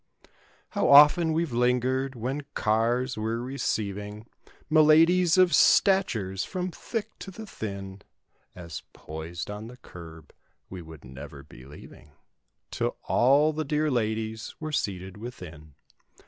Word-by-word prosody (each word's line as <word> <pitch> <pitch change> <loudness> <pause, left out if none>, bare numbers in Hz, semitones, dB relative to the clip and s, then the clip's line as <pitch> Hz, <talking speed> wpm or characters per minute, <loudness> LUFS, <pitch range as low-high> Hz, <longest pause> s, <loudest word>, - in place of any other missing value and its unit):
How - - 0
often 150 +4 +7
weVe 160 -2 -1
lingered 125 +2 0
when 130 +5 -3
cars 115 +3 0
were 110 +2 -2
receiving 105 -5 -4 0.4
Miladies 165 +3 +5
of 185 -3 +5
statures 115 - +3
from 185 -1 -4
thick 225 +6 -5
to - - -8
the 220 +4 -9
thin— 100 - -7 0.5
"As 85 -3 -8
poised 80 +4 -7
on 105 +2 -7
the 125 +1 -12
curb" 80 - -13 0.4
we 95 -1 -7
would 80 -4 -13
never 70 +2 -10
be 65 -3 -15
leaving 75 +1 -14 0.6
'Till - - -2
all 140 +5 +3
the 155 +1 -2
dear 150 +1 0
ladies 110 -2 -2
were 155 -1 -5
seated 95 -8 -3
within. 85 - -10
115 Hz, 125 wpm, -26 LUFS, 95-150 Hz, 0.6 s, often